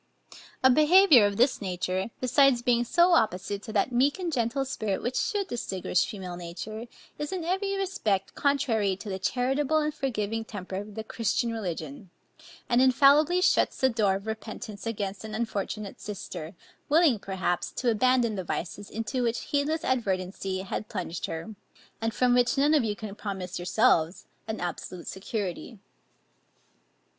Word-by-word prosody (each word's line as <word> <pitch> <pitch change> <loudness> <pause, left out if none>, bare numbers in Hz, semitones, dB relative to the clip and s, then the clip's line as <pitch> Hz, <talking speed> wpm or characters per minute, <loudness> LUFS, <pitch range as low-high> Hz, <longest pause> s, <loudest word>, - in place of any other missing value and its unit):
A 260 - +7
behaviour 305 - +7
of 200 -1 -4
this 250 +1 +3
nature, 185 +1 -2
besides 255 -1 +4
being 240 -1 +3
so 345 +8 +4
opposite 200 - +1
to 220 0 -8
that 215 +4 +1
meek 265 +6 +2
and 355 -4 -3
gentle 250 +2 0
spirit 215 -7 -2
which 245 +2 -2
should 405 -2 0
distinguish 190 - -1
female 185 -5 -6
nature, 195 +7 -7 0.3
is 295 0 -3
in 370 -3 -3
every 390 +3 -1
respect 215 - -1
contrary 240 -9 +1
to 205 +2 -9
the 190 -1 -3
charitable 265 +8 +1
and 305 0 0
forgiving 225 -5 -2
temper 190 -4 -6
of 205 +1 -7
the 220 - -4
Christian 230 +1 -1
religion, 175 -5 -5 0.6
and 240 +1 +3
infallibly 285 +6 +5
shuts - - +3
the 265 - +3
door 210 -5 +2
of 195 +1 -6
repentance 220 -1 -6
against 200 -3 -3
an 215 -1 -6
unfortunate 215 -2 -4
sister, 190 -4 -7 0.3
willing, 300 -6 +4
perhaps, 185 -3 -2
to 245 -2 +1
abandon 245 0 +2
the 190 -2 -3
vices 180 +4 -5
into 225 +4 -3
which 235 -1 0
heedless 300 +3 -1
inadvertency 190 -5 -1
had 195 +2 -5
plunged 180 -4 -4
her, 165 +7 -6 0.5
and 225 0 0
from 245 +3 +2
which 245 +1 +3
none 290 +3 +4
of 295 -5 +4
you 210 -2 -1
can 210 -1 -7
promise 190 -4 -5
yourselves 175 -1 +2 0.2
an 220 0 -3
absolute 175 0 -5
security. 200 +2 -4
220 Hz, 155 wpm, -27 LUFS, 195-265 Hz, 0.6 s, A